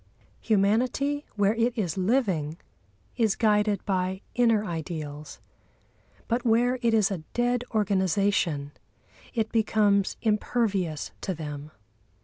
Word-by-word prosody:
Humanity, 245 +8 +1
where 205 0 +3
it 230 +1 0
is 180 -7 -1
living, 185 - 0 0.6
is 220 -4 +2
guided 210 -3 +2
by 190 0 -1
inner 230 -3 +3
ideals; 155 -4 -6 0.9
but 235 +1 0
where 245 +2 +2
it 230 -2 +3
is 210 -2 +3
a 190 - -2 0.2
dead 245 0 +1
organisation 190 -7 +1 0.6
it 220 -2 0
becomes 210 -3 +2
impervious 205 -7 0
to 190 - -2
them. 150 -2 -6
205 Hz, 110 wpm, -27 LUFS, 180-230 Hz, 0.9 s, where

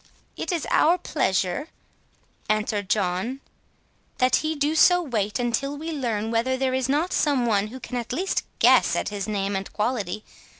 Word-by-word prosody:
"It - - -3
is 335 -4 -1
our 340 +3 +4
pleasure," 190 - -1 0.8
answered 210 -2 0
John, 200 +6 0 0.8
"that 255 -1 +3
he 315 0 -2
do 295 +1 0
so 355 +3 +6
wait 220 - -1
until 265 +4 -1
we 320 +3 -5
learn 230 -7 -2
whether 245 +3 +1
there 260 -1 0
is 260 0 0
not 305 +6 +1
some 280 -5 +2
one 210 -3 +1
who 255 +4 -9
can 250 - -5
at 235 -2 -4
least 365 +9 -1
guess - - +5
at - - -1
his 205 -1 -4
name 200 -1 -1
and 195 0 -4
quality. 210 -3 -2
245 Hz, 170 wpm, -24 LUFS, 210-285 Hz, 0.8 s, so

